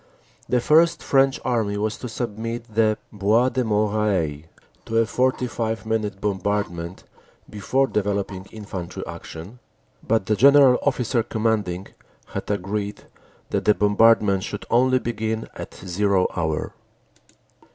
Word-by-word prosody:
The 125 - +3
First 160 +6 +3
French 135 -1 +3
Army 110 -4 0
was 110 +1 -1
to 125 - -6
submit 115 0 -5
the 110 -1 +3 0.2
Bois 110 +5 +3
de 130 -1 -1
Moreuil 105 -8 0 0.4
to 115 - -1
a 115 - +4
45 120 -3 -1
minute 110 -3 -2
bombardment 95 -3 -2 0.4
before 125 +6 0
developing 100 -4 -2
infantry 95 -5 -7
action, 90 +10 -9 0.4
but 110 -3 0
the 110 - +1
General 140 +1 +6
Officer 125 -3 +1
Commanding 110 -5 -1 0.4
had - - -6
agreed 100 +1 -3 0.5
that - - -1
the 105 - +5
bombardment 105 0 +4
should 105 0 -6
only 130 +2 +4
begin 110 -2 -3
at - - -8
"zero" 95 +1 +1
hour. 80 -3 -2
110 Hz, 120 wpm, -23 LUFS, 100-120 Hz, 0.5 s, General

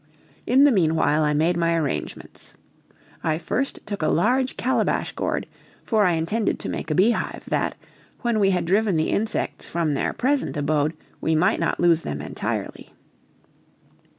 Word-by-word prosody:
In 260 +3 +5
the 290 - +6
meanwhile 160 -6 +2
I 150 -1 +2
made 165 +4 +2
my 170 0 +2
arrangements. 155 -4 -4 0.7
I 155 -1 +1
first 250 +11 -2
took 205 -3 -5
a 155 - +1
large 255 +11 +1
calabash 260 - 0
gourd, - - -2 0.4
for 215 -3 +2
I 180 - +3
intended 170 +7 0
to - - -6
make - - -4
a 155 - 0
beehive, 215 +7 +1
that, - - 0 0.5
when 235 -3 +1
we 195 -2 +4
had 180 -2 0
driven 195 0 +2
the 155 - 0
insects 220 +1 -2
from 165 -3 -1
their 140 - 0
present 265 - -1
abode, 150 +1 0 0.3
we 160 - +1
might 170 +4 +2
not - - -1
lose 170 -2 +4
them 75 - -4
entirely. 75 - -5
170 Hz, 160 wpm, -23 LUFS, 155-220 Hz, 0.7 s, the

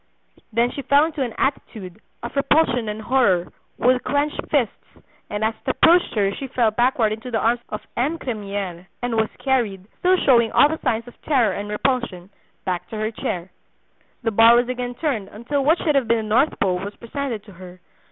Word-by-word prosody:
Then 235 +2 +2
she 280 - -5
fell 280 +3 +4
into 315 -3 -4
an 240 -4 -2
attitude, 215 -8 -3 0.2
of 235 - -6
repulsion 275 -5 +2
and 215 +1 -5
horror, 205 -9 +2 0.2
with 250 0 +2
clenched 290 +1 0
fists, 265 -8 0 0.5
and 210 +1 -3
as 220 +1 +1
it - - -3
approached 345 -2 +4
her 200 -2 +1
she 270 - -6
fell 240 -4 +1
backward 240 -1 +2
into 220 +3 -7
the 230 - 0
arms 235 +2 +2
of 210 - -5
M. 285 +7 0
Cremiere, 200 - -5 0.2
and 245 -2 -1
was 220 -1 +1
carried, 230 -9 -1
still 370 +1 +3
showing 235 -8 +4
all 290 - +6
the 320 - -3
signs 235 -3 -1
of 245 - -15
terror 245 -9 +2
and 205 +2 -5
repulsion, 210 -5 -2 0.3
back 180 -2 -2
to 220 - -6
her 215 +1 -2
chair. 180 -4 -4 0.7
The 225 - 0
bar 225 +2 +7
was 240 +1 +2
again 250 -1 -3
turned 245 -10 -2
until 250 +8 -3
what 315 +5 +4
should 305 - 0
have 275 -4 +2
been 225 -1 +1
the 215 - +1
north 275 +5 +2
pole 185 -2 +1
was 200 +2 -6
presented 235 -2 -5
to 210 - -14
her. 180 0 -12
235 Hz, 200 wpm, -22 LUFS, 210-265 Hz, 0.7 s, bar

